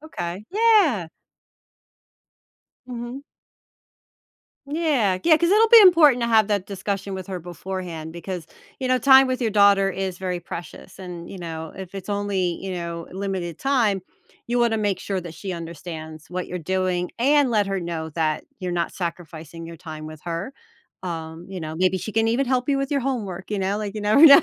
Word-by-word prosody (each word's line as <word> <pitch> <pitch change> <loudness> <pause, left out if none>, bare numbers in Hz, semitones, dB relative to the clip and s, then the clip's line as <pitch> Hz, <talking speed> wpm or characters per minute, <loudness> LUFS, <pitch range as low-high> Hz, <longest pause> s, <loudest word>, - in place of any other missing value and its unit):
Ma 310 - -12
okay, 175 - -5
yeah. 395 - +4 1.8
Mhm. 245 +1 -6 1.5
Yeah, 280 - +1
yeah, 325 -2 +7
'cause 340 +2 +1
it'll 440 +3 +5
be 460 0 +10
important 330 - +7
to 235 - +1
have 220 -2 +4
that 200 -3 0
discussion 195 0 -4
with 190 -1 -6
her 185 -2 -4
beforehand, 175 -1 -6
because, 175 -1 -6 0.3
you 260 - -2
know, 255 0 +3
time 265 +1 +7
with 255 0 -2
your 230 -3 +1
daughter 200 -1 +5
is 190 -2 -3
very 180 -2 -3
precious 170 +2 -9
and, 175 -2 -8
you 195 - -8
know, 160 -2 -6
if 190 0 -8
it's 195 0 -7
only, 200 -4 -1
you 190 -1 -4
know, 170 -1 -5
limited 190 -3 -4
time, 230 -9 +1 0.4
you 240 +1 0
wanna 235 -2 +3
make 205 -3 0
sure 195 0 -3
that 170 -2 -9
she 185 +4 -5
understands 165 -2 -8
what 180 0 -3
you're 180 - -5
doing, 180 +1 -1
and 280 +2 +4
let 210 -3 +2
her 195 -1 -2
know 165 -2 -4
that 155 -1 -1 0.2
you're 180 -1 -3
not 170 -1 -1
sacrificing 165 -2 -6
your 165 - -9
time 155 -2 -8
with 155 -1 -10
her. 175 +9 -4 0.5
Um, 165 -1 -6
you 190 -2 -6
know, 155 -1 -5
maybe 185 +2 +2
she 215 - -6
can 225 +1 +2
even 250 +4 +1
help 250 0 0
you 275 -1 +2
with 275 +1 -2
your 280 -1 +1
homework, 210 -9 -3
you 210 - -1
know, 195 +2 0
like, 210 -1 -4
you 215 - -4
never 215 +9 +6
know, 280 +2 +10
190 Hz, 190 wpm, -23 LUFS, 175-240 Hz, 1.8 s, be